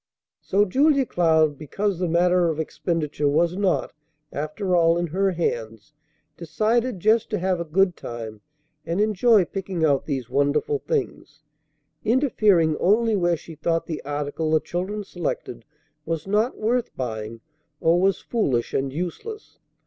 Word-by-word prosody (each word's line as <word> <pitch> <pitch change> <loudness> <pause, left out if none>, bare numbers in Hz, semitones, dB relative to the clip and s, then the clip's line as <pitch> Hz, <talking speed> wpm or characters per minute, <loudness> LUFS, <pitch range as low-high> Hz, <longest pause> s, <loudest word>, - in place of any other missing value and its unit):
So 205 +2 +2
Julia 275 +6 +3
Cloud, 160 - +2
because 190 +5 -2
the 180 - 0
matter 175 +1 +3
of 160 -1 -3
expenditure 155 -2 -2
was 165 +4 +2
not, 190 -2 0 0.4
after 165 +6 -2
all, 165 -1 +4
in 175 - 0
her 190 +4 0
hands, 115 -7 -3 0.4
decided 215 +7 0
just 215 +4 +2
to 210 - -1
have 185 -1 0
a - - -1
good 180 +2 +2
time 110 -3 -7 0.4
and 170 +3 -2
enjoy 215 -1 +4
picking 185 -4 -2
out 140 -3 +1
these 135 -5 -3
wonderful 145 - +1
things, 385 - -4 0.6
interfering 210 - +3
only 220 +4 +3
where 175 -3 +1
she 165 - -12
thought 165 +2 -1
the 160 - -5
article 145 +2 -3
the 155 0 +4
children 190 +6 -4
selected 175 - -5 0.4
was 160 0 -3
not 210 +5 0
worth 235 +2 0
buying, 115 -2 -5 0.4
or 170 +2 +3
was 195 0 +2
foolish 135 - -1
and 135 0 -1
useless. 180 - -6
175 Hz, 145 wpm, -24 LUFS, 150-205 Hz, 0.6 s, all